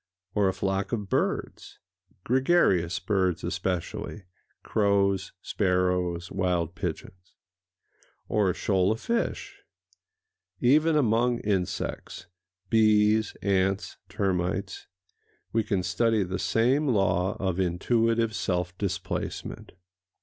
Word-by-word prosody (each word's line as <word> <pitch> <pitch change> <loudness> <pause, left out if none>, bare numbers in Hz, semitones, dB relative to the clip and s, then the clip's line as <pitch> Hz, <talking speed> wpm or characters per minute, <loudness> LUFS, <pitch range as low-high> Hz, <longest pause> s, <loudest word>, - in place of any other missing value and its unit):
Or 100 -2 +2
a - - -1
flock 95 0 -1
of 105 -4 -3
birds—gregarious 105 - 0
birds 95 -4 0
especially: 95 +2 -3 0.4
crows, 100 -2 +1
sparrows, 90 -2 0
wild 90 -3 0
pigeons? 90 +1 -6 0.9
Or 105 -3 +2
a 90 - -1
shoal 95 -1 +1
of 110 - -2
fish? 235 0 -3 1.0
Even 150 +6 +4
among 120 -3 +2
insects—bees, 95 +3 0
ants, 95 0 0
termites—we 95 +2 -4
can 95 -3 -1
study 105 +4 +1
the 95 0 -4
same 125 +9 +2
law 95 -5 +1
of 95 -1 -1
intuitive 115 +5 +1
self 90 -3 -2
displacement. 100 -3 -4
95 Hz, 90 wpm, -27 LUFS, 90-110 Hz, 1.0 s, Even